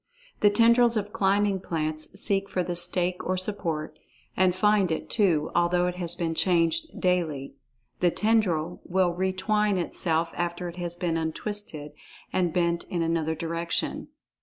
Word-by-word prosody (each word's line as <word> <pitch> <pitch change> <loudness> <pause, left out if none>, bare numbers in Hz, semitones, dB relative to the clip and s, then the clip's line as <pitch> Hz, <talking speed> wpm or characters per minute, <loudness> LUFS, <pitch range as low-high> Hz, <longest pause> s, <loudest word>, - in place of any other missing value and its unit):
The 205 - +5
tendrils 235 +2 +4
of 205 0 -3
climbing 200 -1 +2
plants 155 +1 -2
seek 195 0 0
for 185 -2 -1
the 175 0 -3
stake 180 +1 +1
or 185 0 -1
support, 170 -6 -3 0.4
and 185 -1 +3
find 205 -1 +3
it, 160 - -3
too, 170 -8 +2
although 175 +1 +2
it 180 - -1
has 175 -1 -2
been 165 -2 -2
changed 175 - +1
daily. 165 -7 0 0.5
The 180 - +4
tendril 180 -6 0
will 180 -1 +1
retwine 190 +3 0
itself, 165 -1 +1
after 175 +1 -3
it 175 0 -8
has 175 -1 -3
been 170 -2 -1
untwisted 160 -2 -4 0.4
and 180 -2 +1
bent 170 0 0
in 170 -2 -2
another 165 -1 0
direction. 170 +1 -3
180 Hz, 150 wpm, -26 LUFS, 165-195 Hz, 0.5 s, The